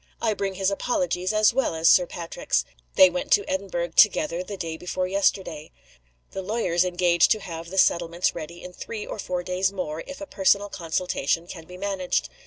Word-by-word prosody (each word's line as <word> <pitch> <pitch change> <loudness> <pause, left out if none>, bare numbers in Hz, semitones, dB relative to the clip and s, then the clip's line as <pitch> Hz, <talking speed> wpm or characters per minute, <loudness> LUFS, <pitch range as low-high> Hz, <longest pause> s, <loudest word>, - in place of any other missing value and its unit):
"I 225 -2 +1
bring 195 -1 -3
his 195 +1 +1
apologies, 200 - -1
as 215 +1 +4
well 250 -9 0
as 160 +1 +1
Sir 180 0 +6
Patrick's. 170 -1 -2 0.3
They 190 - +9
went 180 0 -4
to 200 - +3
Edinburgh 185 -3 -2
together 170 -2 +4
the 200 +2 -7
day 165 -3 -4
before 180 +2 -3
yesterday. 185 -5 -1 0.6
The 190 - -5
lawyers 185 -4 0
engage 175 -1 +3
to 215 - +2
have 170 -3 -7
the 190 - -7
settlements 170 -1 +2
ready 170 +1 -8
in 180 - -9
three 215 +3 -6
or - - -7
four 180 -2 -3
days 185 +2 0
more, 165 -5 -4
if 280 - -8
a 295 - -6
personal 200 -4 +2
consultation 170 -2 -1
can 170 -2 -10
be 180 +2 -11
managed. 190 -2 -1
185 Hz, 190 wpm, -25 LUFS, 170-200 Hz, 0.6 s, They